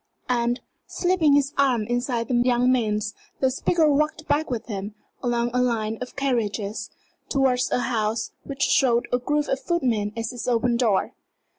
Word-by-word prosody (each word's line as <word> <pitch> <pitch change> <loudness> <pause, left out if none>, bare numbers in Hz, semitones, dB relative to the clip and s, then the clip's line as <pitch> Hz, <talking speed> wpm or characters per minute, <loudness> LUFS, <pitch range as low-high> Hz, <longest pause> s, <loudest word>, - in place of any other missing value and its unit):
And, 240 0 +1 0.3
slipping 355 -5 +2
his 285 0 +2
arm 255 -5 +3
inside 240 0 -1
the - - -2
young 245 +1 +3
man's, 215 -4 0 0.3
the 265 -1 +2
speaker 320 +4 +2
walked 305 +2 +1
back 295 +2 +1
with 240 -3 -3
him, 205 -1 -5 0.3
along 240 -1 0
a 250 - +2
line 225 -3 0
of 250 - -6
carriages, 215 -6 -1 0.4
towards 260 -2 +2
a 250 - +1
house 225 -2 -1
which 275 -1 -3
showed 240 -3 +3
a 245 - +3
group 295 +4 0
of 270 - 0
footmen 245 - 0
at 225 +1 -3
its 245 - -6
open 240 0 +2
door. 225 -5 +1
245 Hz, 165 wpm, -24 LUFS, 225-270 Hz, 0.4 s, arm